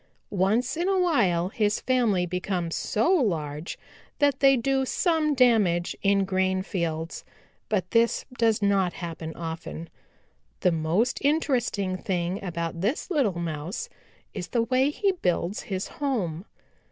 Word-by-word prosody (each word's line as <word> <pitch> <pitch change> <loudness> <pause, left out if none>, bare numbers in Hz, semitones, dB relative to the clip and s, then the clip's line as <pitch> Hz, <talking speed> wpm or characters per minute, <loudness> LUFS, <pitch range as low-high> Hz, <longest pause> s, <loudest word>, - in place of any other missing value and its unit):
Once 215 +7 +1
in 345 +3 -1
a 390 - +2
while 185 - +2
his 210 0 0
family 230 -8 +2
becomes 180 -1 -2
so 225 - +1
large 160 - -1 0.4
that 285 -2 +2
they 270 -1 +6
do 270 +3 +1
some 310 +1 +1
damage 210 -9 +3
in 200 -1 +3
grain 190 0 0
fields. 165 -4 -3 0.5
But 185 -4 -1
this 230 0 +2
does 225 -3 +2
not 195 -3 +2
happen 165 -2 -6
often. 165 0 -6 0.7
The 180 - +4
most 165 +9 +1
interesting 245 -10 +1
thing 180 +1 -2
about 170 -2 -3
this 240 - -1
little 250 - +1
Mouse 170 - -4 0.4
is 180 -4 -5
the 235 -2 +1
way 255 +4 +2
he 390 +6 +1
builds 180 - -1
his 190 0 -2
home. 200 - -2
200 Hz, 135 wpm, -26 LUFS, 175-255 Hz, 0.7 s, they